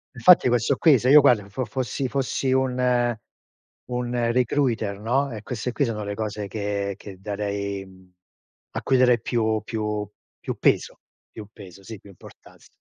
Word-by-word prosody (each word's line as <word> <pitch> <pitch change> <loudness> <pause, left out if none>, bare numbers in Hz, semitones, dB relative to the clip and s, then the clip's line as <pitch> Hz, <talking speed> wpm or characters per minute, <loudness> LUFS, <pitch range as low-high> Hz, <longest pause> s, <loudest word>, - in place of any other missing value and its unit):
Infatti 180 -7 +6
questo 120 +2 +2
qui 145 -7 +5
se 125 - 0
io 150 +1 +9
guarda 110 -7 +3
fo 125 +6 -3
fossi 130 +3 -3
fossi 135 0 -1
un 125 -2 +1 0.7
un 120 -1 -1
recruiter, 120 -5 0
no, 130 +5 0
e 105 - -7
queste 125 +2 -4
qui 140 +3 0
sono 105 -2 -3
le 100 0 -4
cose 105 -1 -4
che 100 -1 -3
che 100 -2 -11
darei, 100 -1 -4
mhmm, 95 -1 -19 0.6
a - - -2
cui 130 - +2
darei 125 -1 +4
più 110 -2 0
più 105 -2 -3 0.3
più - - -5
peso, - - +1 0.3
più 105 -2 -10
peso, 100 -3 -13
sì, 110 0 -9
più 100 - -17
importanz 95 - -17
115 Hz, 165 wpm, -24 LUFS, 100-125 Hz, 0.7 s, io